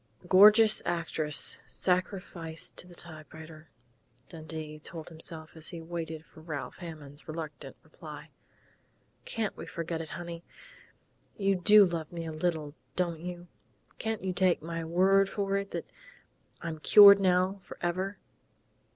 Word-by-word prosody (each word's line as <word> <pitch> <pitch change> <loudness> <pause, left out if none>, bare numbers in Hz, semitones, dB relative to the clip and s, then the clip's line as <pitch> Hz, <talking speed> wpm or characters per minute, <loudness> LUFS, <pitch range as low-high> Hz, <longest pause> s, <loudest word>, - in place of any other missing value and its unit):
"A - - -15
gorgeous 210 +4 +7
actress 160 -3 +1
sacrificed 180 -3 -1
to 180 - -5
the 175 - -13
typewriter," 155 -1 -10 0.6
Dundee 155 -1 -6
told 160 +1 -9
himself, 160 -1 -5
as 160 -1 -3
he 170 - -6
waited 160 -1 -6
for 160 - -17
Ralph 155 -3 -6
Hammond's 155 -4 -10
reluctant 155 -1 -7
reply. - - -11 0.9
"Can't 225 -2 -3
we - - -9
forget 165 0 -4
it, 160 - -8
honey?... 170 -1 -7 0.9
You 195 -1 +2
do 205 +3 +7
love 170 -3 -4
me 170 -1 -5
a 160 - -5
little, 155 -2 -2 0.2
don't 170 -3 -1
you? 175 +1 -7 0.5
Can't 220 -2 -3
you 185 -1 -1
take 180 -4 +2
my 165 0 -4
word 190 +4 +3
for 195 -1 -2
it 200 0 -2
that - - -5 0.8
I'm 160 -2 -5
cured 200 +4 +9
now 185 +1 +2
forever?" 185 +4 -3
170 Hz, 135 wpm, -29 LUFS, 160-185 Hz, 0.9 s, cured